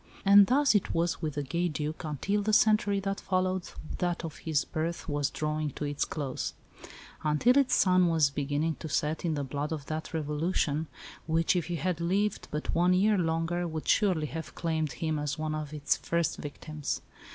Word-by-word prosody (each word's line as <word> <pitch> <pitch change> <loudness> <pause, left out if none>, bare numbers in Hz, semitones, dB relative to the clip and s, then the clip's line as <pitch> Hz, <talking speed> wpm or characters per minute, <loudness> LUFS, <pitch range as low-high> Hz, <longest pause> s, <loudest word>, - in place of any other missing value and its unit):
And 200 0 +8
thus 280 +1 +4
it 205 - +1
was 170 +1 0
with 155 -3 -3
the 145 - -1
gay 170 +5 -1
Duc 155 -1 -4
until 195 +8 -1
the 215 +1 0
century 210 -2 +4
that 195 0 -2
followed 185 -1 0 0.3
that 175 -1 -1
of 160 - -7
his 155 -3 0
birth 165 +1 -3
was 145 -2 0
drawing 155 0 -2
to 150 - -4
its 145 0 -1
close; 140 -4 -4 0.7
until 155 +12 +3
its 275 -2 +4
sun 185 -1 +4
was 160 -4 +3
beginning 145 +3 -1
to 160 - -6
set 150 +2 -1
in 160 -2 +1
the 145 - -2
blood 145 +3 -3
of 150 -3 -4
that 155 +2 -4
Revolution, 155 0 -1 0.4
which, 165 +3 +2
if 175 - 0
he 175 - -2
had 175 0 -1
lived 195 +4 0
but 150 0 -3
one 175 +2 +4
year 210 +3 +4
longer, 170 0 0
would 160 -1 -5
surely 185 -7 +3
have 160 +2 -6
claimed 160 -4 -1
him 160 -3 -2
as 145 0 -2
one 155 0 -2
of 155 -1 -4
its 145 -2 0
first 170 -1 -1
victims. 150 0 -5
160 Hz, 190 wpm, -29 LUFS, 150-180 Hz, 0.7 s, And